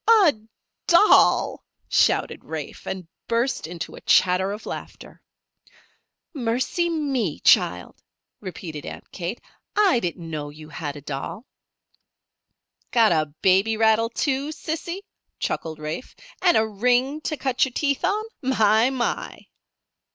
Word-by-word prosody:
"A 305 - +5 0.5
doll!" 350 +5 +5 0.2
shouted - - +2
Rafe, - - -7
and 185 -3 -5 0.2
burst 235 -4 0
into 170 0 -6
a - - -11
chatter 185 +1 +3
of 210 +2 -7
laughter. - - -8 1.1
"Mercy 260 +6 0
me, 275 - -1
child!" 90 0 +3 0.4
repeated 165 -5 -7
Aunt - - -9
Kate. 180 +5 -5 0.4
"I 390 - +4
didn't 175 -3 -4
know 150 -2 -4
you 155 +1 -12
had 145 -2 -5
a 145 - -9
doll." 145 - -6 1.4
"Got 230 -4 +4
a 155 -2 +2 0.2
baby 195 +4 +4
rattle, 220 +1 +3
too, 275 +4 -1
Sissy?" 325 +4 -4 0.4
chuckled 160 -1 -3
Rafe. 155 +9 -6 0.3
"And 360 -2 +5
a 220 - +3
ring 250 +7 +1
to 305 - -2
cut 260 -1 +1
your 265 - +1
teeth 280 +1 0
on? 405 +4 +1 0.2
My, 225 -3 +3
my!" 255 -3 -3
225 Hz, 125 wpm, -24 LUFS, 170-275 Hz, 1.4 s, A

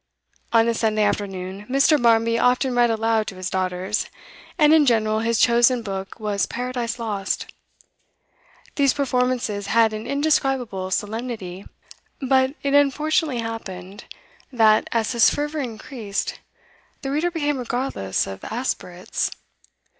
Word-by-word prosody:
On 230 0 +4
a 235 - +2
Sunday 215 -1 +1
afternoon, 195 -1 -3
Mr. 275 +2 +4
Barmby 230 0 +3
often 250 +1 +2
read 240 -1 +3
aloud 225 -1 +1
to 195 - -6
his 185 -1 -5
daughters, 185 +2 -1 0.5
and 305 -2 +5
in 305 -3 +5
general 220 -2 +2
his 230 0 0
chosen 240 +1 +4
book 195 0 -6
was 210 -2 -1
'Paradise 245 -1 -3
Lost.' 205 -5 -3 1.2
These 275 -2 +3
performances 250 -6 0
had 225 0 +3
an 215 +2 -5
indescribable 270 -8 0
solemnity, 205 -2 -4 0.5
but 265 0 +2
it 280 0 0
unfortunately 285 -1 +2
happened 200 -3 -7 0.5
that, 220 -4 +4
as 225 -2 0
his 235 -3 +5
fervour 295 +1 -2
increased, 225 -4 -4 0.6
the 270 - -2
reader 310 +5 +1
became 295 -5 -1
regardless 240 - -2
of 95 0 -8
aspirates. 200 -6 -3
230 Hz, 125 wpm, -23 LUFS, 210-260 Hz, 1.2 s, and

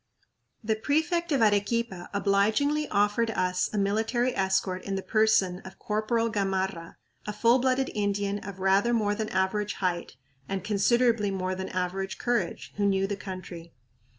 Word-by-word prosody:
The 220 0 +1
prefect 320 +8 0
of 270 -5 +3
Arequipa 205 -2 0
obligingly 215 +10 +1
offered 210 +3 +1
us 185 -4 0
a 215 - -3
military 225 +5 0
escort 190 -1 0
in 195 - -3
the 190 - -3
person 215 -5 +2
of 190 0 -12
Corporal 220 +2 0
Gamarra, 190 -5 -2 0.3
a - - -1
full 235 +4 +4
blooded 260 +1 +1
Indian 205 -1 -1
of 195 -1 -9
rather 195 +5 +3
more 210 -2 +1
than 215 +1 -3
average 195 +2 0
height 175 -6 -2 0.3
and 195 -2 -3
considerably 225 +1 +2
more 185 -1 -2
than 190 0 -5
average 185 0 -3
courage, 240 -1 -2
who 205 - +1
knew 195 -1 +2
the 200 +1 -2
country. 185 -3 -8
205 Hz, 150 wpm, -27 LUFS, 190-225 Hz, 0.3 s, full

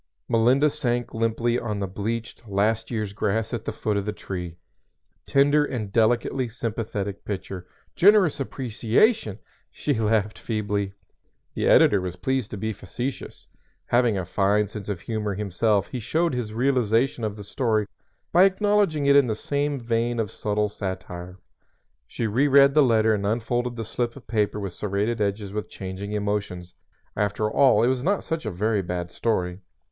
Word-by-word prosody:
"_ - - -51 0.2
Melinda 125 +5 +4
sank 120 -5 -2
limply 115 +1 0
on 105 -3 -3
the 100 - -1
bleached, 110 +4 -5
last 105 +3 +1
year's 110 -4 -3
grass 110 +3 -1
at 115 -1 -4
the - - -2
foot 105 -2 -2
of 100 - -2
the - - 0
tree. 90 -5 -6 0.7
"Tender 145 +2 +4
and 110 -8 -4
delicately 120 +3 +2
sympathetic 110 -4 -4
picture" 95 -2 -6 0.3
"Generous 190 -6 +5
appreciation!" 125 - +1 0.3
She 145 - -2
laughed 110 -2 0
feebly. 105 -3 -2 0.6
The - - -1
editor 100 -2 +6
was 90 -1 -4
pleased 130 +4 -1
to 105 - -6
be 110 +3 -2
facetious. 120 +8 -6 0.4
Having 120 -4 +2
a 95 - -2
fine 100 +3 +2
sense 105 0 -8
of 95 -4 -3
humor 105 -3 -3
himself 105 +1 +1
he 125 - -4
showed 160 +8 0
his 120 -4 -3
realization 120 0 +1
of 105 -2 -2
the 105 - -9
story 110 0 0 0.5
by 180 +2 +7
acknowledging 195 -6 +2
it 140 0 +5
in 140 -3 +6
the 110 - -1
same 145 +4 -1
vein 115 0 -1
of 110 -3 -1
subtle 105 0 -1
satire. 95 -2 -6 0.7
She 115 - -3
reread 140 +5 +5
the 155 - +5
letter 110 -4 +4
and 100 -2 -1
unfolded 120 +3 -1
the 115 -1 -4
slip 120 +2 -2
of 135 - -13
paper 105 -2 0
with 100 -3 -5
serrated 105 +4 -1
edges 100 0 -1
with 105 0 -4
changing 95 +2 -6
emotions. 100 -4 -3 0.4
After 105 +1 0
all 135 -4 +5
it - - +4
was 130 0 0
not 200 +4 +1
such 160 -7 -3
a - - -1
very 105 +3 0
bad 90 -1 -4
story. 90 -5 -1
110 Hz, 165 wpm, -25 LUFS, 100-125 Hz, 0.7 s, by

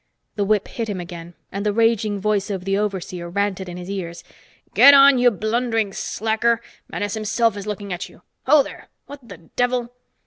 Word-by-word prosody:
The 205 - 0
whip 205 0 +1
hit 230 -2 -5
him 195 -3 -3
again, 175 -1 -9 0.2
and 200 +1 -4
the 210 - +1
raging 220 -2 +1
voice 205 0 0
of 190 -3 -4
the 195 0 0
overseer 185 -4 -3
ranted 195 0 -2
in 175 - -7
his 180 0 -8
ears. 180 -4 -5 0.5
"Get 280 0 +9
on, 275 -1 +7
you 245 0 +6
blundering 225 0 -1
slacker. 225 +3 0 0.3
Menes 205 -1 -4
himself 220 0 0
is 205 0 -7
looking 205 -2 -4
at 175 - -6
you. - - -20 0.2
Ho 300 -2 +6
there - - -11 0.2
what 275 -5 -12
the 185 - -9
devil?" 245 +7 -2
205 Hz, 185 wpm, -21 LUFS, 190-230 Hz, 0.5 s, Get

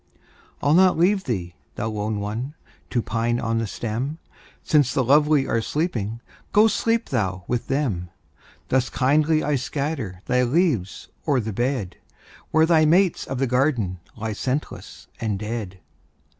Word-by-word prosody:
I'll 145 +2 +4
not 185 +1 +5
leave 190 +4 +3
thee, 90 -9 -3 0.2
thou 110 - -2
lone 105 0 -2
one! 115 +8 -4 0.3
To 120 -3 0
pine 115 +1 0
on 115 0 0
the 115 - -1
stem; 120 +9 -3 0.5
Since 145 -5 +3
the 135 - +3
lovely 145 +2 +4
are 115 - 0
sleeping, 115 - -2 0.3
Go, 210 +1 +6
sleep 230 +2 0
thou 95 -3 -1
with 120 -1 -2
them. 120 -12 -1 0.6
Thus 130 -1 +2
kindly 155 +4 +2
I 150 - 0
scatter 130 - -3
Thy 125 0 +2
leaves 125 - 0 0.2
o'er 140 -4 +3
the 110 -2 -3
bed, 120 -5 -2 0.5
Where 160 0 +4
thy 160 -1 +4
mates 175 +3 +3
of 135 - -3
the 135 - +1
garden 125 - +1 0.2
Lie 110 0 -3
scentless 130 +7 -4
and 110 -3 -1
dead. 105 -3 -5
125 Hz, 150 wpm, -23 LUFS, 110-150 Hz, 0.6 s, Go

